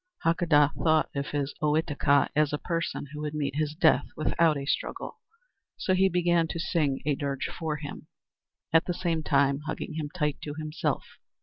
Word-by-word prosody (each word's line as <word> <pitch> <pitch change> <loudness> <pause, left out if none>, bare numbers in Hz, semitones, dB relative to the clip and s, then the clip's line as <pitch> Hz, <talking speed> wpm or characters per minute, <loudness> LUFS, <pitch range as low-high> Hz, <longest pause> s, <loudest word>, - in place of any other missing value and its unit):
Hakadah 165 -3 +4
thought 155 -1 +3
of 140 0 -2
his 145 -1 -2
Ohitika 150 -2 +2
as 150 -1 +3
a 150 - 0
person 165 -2 -3
who 150 - -6
would 150 0 -4
meet 140 -2 -2
his 155 -1 -1
death 160 -1 +4
without 155 0 +2
a 140 - -4
struggle, - - -3 0.6
so 185 - 0
he 190 +1 +4
began 175 -1 +2
to 165 - -5
sing 150 -5 0
a 150 - +2
dirge 140 -1 -2
for 160 -2 -3
him, 145 -1 -8 0.7
at 165 +1 +5
the 175 - -2
same 170 -3 -1
time 140 -2 +2
hugging - - -4
him 150 -2 -3
tight 150 -4 -1
to 145 -1 -6
himself. 155 0 -2
150 Hz, 180 wpm, -28 LUFS, 145-165 Hz, 0.7 s, at